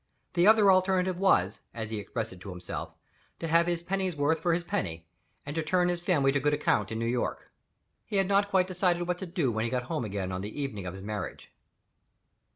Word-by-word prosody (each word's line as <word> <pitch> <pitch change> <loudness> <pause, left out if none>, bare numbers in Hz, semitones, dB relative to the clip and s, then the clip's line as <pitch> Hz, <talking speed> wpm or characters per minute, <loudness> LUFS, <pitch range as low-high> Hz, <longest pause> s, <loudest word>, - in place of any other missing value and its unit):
The 175 +2 +4
other 215 -2 +7
alternative 185 -1 +2
was 110 - +3
(as 110 -1 -5
he 110 - -2
expressed 110 +1 -4
it 90 - -14
himself) 90 -3 -6 0.4
to 165 - -4
"have 165 +2 +4
his 170 -1 -1
pennyworth 170 -5 0
for 170 +2 +1
his 175 - -2
penny, 80 - -3 0.4
and 145 +1 -5
to 165 - +1
turn 180 +3 +2
his 175 -1 -1
family 150 -7 +3
to 140 - +1
good 150 +1 +2
account 105 -8 +1
in 110 - -2
New 115 - -1
York." 120 +1 -2 0.5
He 215 - -6
had 195 -1 +3
not 200 +1 +3
quite 190 -2 +3
decided 180 -1 0
what 180 0 -1
to 190 - -5
do 170 -8 0
when 110 0 -1
he 115 - -1
got 125 0 -1
home 120 - -3
again 100 -3 -3
on 95 0 -3
the 105 +8 -6
evening 105 -10 -4
of 90 - -5
his 95 - -9
marriage. 105 -1 -5
150 Hz, 220 wpm, -29 LUFS, 110-180 Hz, 0.5 s, other